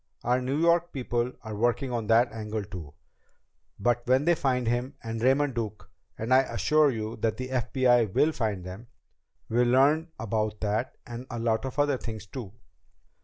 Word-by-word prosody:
Our 125 +2 +2
New 135 +4 -1
York 170 +1 +3
people 120 -2 -1
are 110 -2 -6
working 120 +4 0
on 115 -3 -2
that 115 +2 +4
angle 110 -1 -4
too. 90 -7 -9 0.8
But 120 +3 +2
when 130 +3 +3
we 175 - +5
find 130 -5 0
him 120 +4 -1
and 115 0 -4
Raymond 135 +3 +3
Duke 105 -5 -5 0.3
and 115 +3 0
I 130 - +8
assure 150 +2 +3
you 110 -3 -4
that 110 0 -1
the 130 0 -5
FBI 125 -3 +2
will 155 - +4
find 105 - -2
them 95 +6 -9 0.6
we'll 120 +2 +2
learn 140 +6 +4
about 110 -1 -2
that, 110 +4 -1
and 120 +1 -8
a 120 - -5
lot 115 +1 0
of 130 +1 -5
other 145 -2 +2
things 110 -3 -6
too." 105 -1 -7
120 Hz, 175 wpm, -27 LUFS, 110-130 Hz, 0.8 s, I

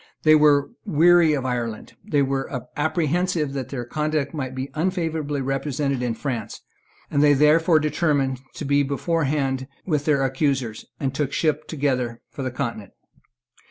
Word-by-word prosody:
They 155 - +6
were 150 -2 +4
weary 170 -3 +5
of 135 -3 -1
Ireland; 120 -3 -3
they 145 -1 +1
were 135 0 -1 0.3
apprehensive 160 0 0
that 135 -2 -4
their 125 -3 -4
conduct 150 +1 -1
might 130 -4 -4
be 130 +1 -4
unfavourably 160 -4 -1
represented 135 0 -1
in 120 -2 -1
France; 120 -6 -4 0.5
they 145 0 +5
therefore 155 +4 +4
determined 145 -4 0
to 150 - -5
be 140 +1 +3
beforehand 140 -2 -1 0.2
with 150 -5 0
their 140 -3 +2
accusers, 130 -4 -1
and 135 -2 -1
took 140 -1 -1
ship 155 -1 0
together 130 -6 -1
for - - -7
the 130 - -1
Continent. 120 -6 -5
140 Hz, 145 wpm, -23 LUFS, 130-155 Hz, 0.5 s, They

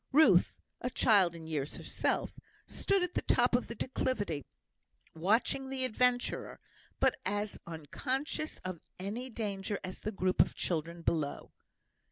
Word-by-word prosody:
Ruth 310 +3 +5 0.2
(a 250 - -1
child 200 -8 +4
in 165 -1 -9
years 150 -3 -2
herself) - - -1 0.3
stood 395 -2 +1
at 360 - -2
the - - 0
top - - +3
of - - 0
the - - -6
declivity 205 - -1 0.7
watching 220 +10 +1
the 265 -1 -1
adventurer, 250 +1 +1 0.4
but - - +3
as 205 +1 -2
unconscious 260 - -3
of 185 -3 -4 0.2
any 215 +7 -4
danger 205 -3 -2
as 185 0 -6
the 215 - -3
group 185 -2 +3
of - - +1
children 170 0 -2
below. 155 -4 -1
205 Hz, 140 wpm, -33 LUFS, 170-255 Hz, 0.7 s, Ruth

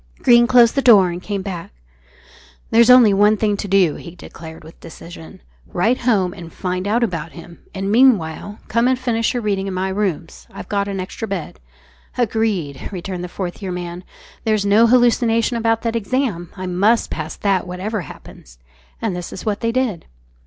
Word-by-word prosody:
Greene 240 -1 +6
closed 240 -2 +5
the 275 - +1
door 200 -8 +6
and 175 +1 -6
came 200 0 -4
back. 180 -4 -6 1.0
"There's 230 +1 +5
only 250 -5 +7
one 210 +2 +4
thing 210 -1 0
to 200 - -5
do," 190 -5 +2
he 170 0 -11
declared 160 -2 -11
with 160 +1 -15
decision. 165 - -12 0.3
"Write 225 +8 +1
home 200 -7 +1
and 170 -3 -11
find 185 +1 -4
out 230 +4 +1
about 165 -7 -3
him, 170 0 -12 0.2
and 195 +1 -2
meanwhile 205 -5 +2
come 230 +2 +1
and 260 0 +2
finish 240 -2 -1
your 240 - -2
reading 195 -2 -1
in 190 - -4
my 190 +1 -1
rooms. 190 -5 -3
I've - - -9
got 200 -1 -1
an 195 -1 -4
extra 190 +4 -6
bed." 195 -5 -5 0.6
"Agreed," 210 - -1
returned 185 -1 -5
the 180 - -6
Fourth 180 +2 -6
Year 190 -2 -4
Man; 175 0 -6 0.4
"there's 215 -3 0
no 210 +3 +5
hallucination 235 -1 +2
about 225 -1 0
that 230 -1 -2
exam; 225 -6 -2
I 185 - -5
must 200 +6 +1
pass 155 -1 -5
that 195 -3 0
whatever 195 +4 -4
happens." - - -13 0.5
And 210 -5 -1
this 175 -1 -6
was - - -9
what 210 -2 -1
they 230 - -1
did. 235 -8 -2
200 Hz, 185 wpm, -19 LUFS, 180-230 Hz, 1.0 s, only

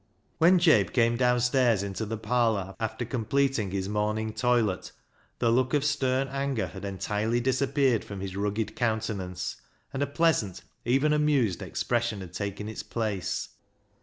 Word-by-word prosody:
When 175 +3 +6
Jabe 160 - +5
came 115 0 +3
downstairs 125 -3 +3
into 100 +2 -4
the 115 +1 -3
parlour, 110 -4 0
after 115 +2 -3
completing 125 -1 0
his 95 0 -2
morning 105 +1 -1
toilet, 115 -7 +1 0.5
the 115 -2 +2
look 130 +3 +2
of 145 -1 +1
stern 135 -2 +1
anger 135 -6 -1
had 95 +2 -9
entirely 105 +4 -1
disappeared 130 -1 +1
from 100 -1 -7
his 95 -1 -5
rugged 105 +2 -2
countenance, 100 -6 -2 0.4
and 135 - -3
a 145 - +1
pleasant, 140 - +1 0.2
even 135 +5 +3
amused, 145 - +2
expression 120 -4 -1
had 90 -2 -9
taken 100 +2 -4
its 110 - -5
place. 105 -5 -3
115 Hz, 145 wpm, -28 LUFS, 100-130 Hz, 0.5 s, When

